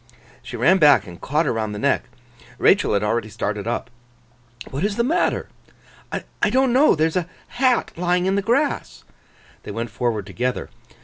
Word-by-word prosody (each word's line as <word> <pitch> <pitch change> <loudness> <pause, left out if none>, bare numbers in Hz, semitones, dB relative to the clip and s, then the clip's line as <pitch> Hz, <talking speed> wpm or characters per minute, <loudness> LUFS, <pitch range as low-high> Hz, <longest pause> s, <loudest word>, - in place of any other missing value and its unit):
She - - -8
ran 190 0 +4
back, 145 - +6
and 85 -3 -12
caught 150 +4 0
her - - 0
round 110 -2 -3
the - - -5
neck. - - +1 0.5
Rachael - - +3
had 100 0 +1
already 110 +1 -1
started 105 +1 -3
up. 120 - -3 0.8
'What 140 +5 -3
is 205 0 0
the 235 - +1
matter?' 330 +8 0 0.6
'I - - -2
don't 260 -1 +2
know. 280 +4 +5
There 155 0 +2
is 160 - -2
a 180 -1 -1 0.2
hat 250 -1 +1
lying 180 +1 +1
in 190 - +1
the 200 - +1
grass.' 265 +8 -1 0.6
They - - -10
went 115 -1 -4
forward 110 -3 -2
together. 125 +6 -3
155 Hz, 180 wpm, -22 LUFS, -, 0.8 s, back